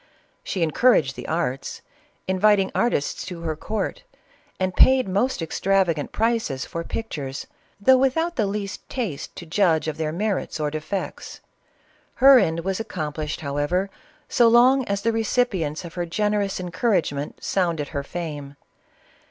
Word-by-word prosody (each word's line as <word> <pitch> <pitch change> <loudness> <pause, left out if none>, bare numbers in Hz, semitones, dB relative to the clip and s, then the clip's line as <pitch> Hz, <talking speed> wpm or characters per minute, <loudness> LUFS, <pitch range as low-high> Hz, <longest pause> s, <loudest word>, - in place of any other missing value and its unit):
She 185 - -1
encouraged 155 - +3
the - - -7
arts, 135 -5 -2 0.4
inviting 195 +1 +3
artists 235 -12 0
to 180 -2 -7
her 160 -2 -2
court, 210 - -3 0.6
and 185 -1 -1
paid 260 -3 +5
most 200 +1 0
extravagant 175 -2 +1
prices 225 - 0
for 165 - -5
pictures, 145 -11 -5 0.3
though 260 +5 +5
without 325 +6 +1
the 215 -4 +1
least 200 0 -5
taste 215 - -4
to 170 - -8
judge 165 -2 +2
of 155 - -3
•their 155 -1 -1
merits 195 -1 -2
or 150 -1 -1
defects. 155 +6 -5 0.7
Her 270 0 +8
end 170 -5 0
was 190 +3 -2
accomplished, 155 -8 -4
however, 145 +7 -1 0.4
so 240 -2 +4
long 250 +3 +5
as 200 -1 -2
the 230 - +2
recipients^ 205 -9 0
her 175 -1 -3
generous 210 +2 0
en 180 -1 -5
couragement 170 -8 0
sounded 170 -6 -1
her 145 -3 -3
fame. 145 -2 -6
185 Hz, 140 wpm, -23 LUFS, 155-220 Hz, 0.7 s, Her